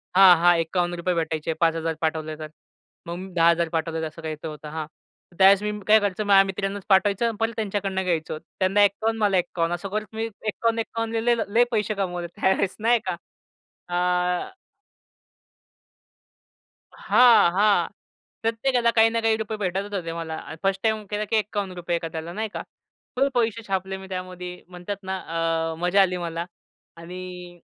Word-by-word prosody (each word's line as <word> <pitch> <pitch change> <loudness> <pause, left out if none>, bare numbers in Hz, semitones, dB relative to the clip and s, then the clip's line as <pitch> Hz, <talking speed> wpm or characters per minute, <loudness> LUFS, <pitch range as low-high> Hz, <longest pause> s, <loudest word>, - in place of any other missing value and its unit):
हां, 190 -1 +9
हां, 175 +1 +5
₹51 175 +1 -1
भेटायचे, 160 -1 -1
5,000 165 0 0
पाठवले 155 -1 -1
तर. 155 0 -7 0.6
मग 170 - -4
मी 190 +1 -8
10,000 170 0 +3
पाठवले 165 0 -2
तर - - -2
असं 155 +2 -11
काहीचं 155 0 -5
होतं 150 -1 -8
हां. 155 0 -4 0.5
तर - - -20
त्यावेळेस 195 +1 +6
मी 210 - -1 0.2
काय 220 +1 +7
करायचं, 205 0 -1
माझ्या 195 -1 +6
मित्रांनाच 195 0 -3
पाठवायचं 205 +4 +3
परत 225 +1 0
त्यांच्याकडून 200 -3 -2
घ्यायचं. 160 -3 -1 0.2
त्यांना 195 +2 +4
51 220 +3 +1
मला 200 -2 +3
51 175 -1 0
असं 195 +3 -7
करत 215 +2 -2
मी 225 - -1 0.2
51-51ला 230 +1 -1
ले 240 +1 +3
ल 225 - 0
लय 235 +2 +6
पैसे 215 -2 0
कमवले 180 -3 -3
त्यावेळेस 190 +2 0
नाही 235 +2 +3
का. 180 - -1 0.8
आ 180 - +1 2.5
हां, 230 -8 +5
हां, 205 +3 +3 0.5
प्रत्येकाला 235 +1 +1
काही 225 0 +5
ना 230 0 -1
काही 225 -1 +2
रुपये 220 0 -4
भेटतच 195 +1 -3
होते. 175 -4 -3
मला 165 -1 -5
अन् 160 - -9
1st 195 0 0
टाईम 220 -1 0
केला, 210 0 -2
की 225 - -1
₹51 190 -5 -2
एखाद्याला 165 0 -5
नाही 220 +3 -3
का. - - -4 0.5
फुल 270 +2 +3
पैसे 230 -1 0
छापले 190 0 -2
मी 190 0 -10
त्यामध्ये 180 -1 -6
म्हणतात 180 +3 -6
ना, 190 0 -3 0.6
अ, - - -8
मजा 180 +3 +3
आली 185 -1 +2
मला 170 -1 -4 0.5
आणि 180 +1 -9
190 Hz, 160 wpm, -24 LUFS, 170-210 Hz, 2.5 s, हां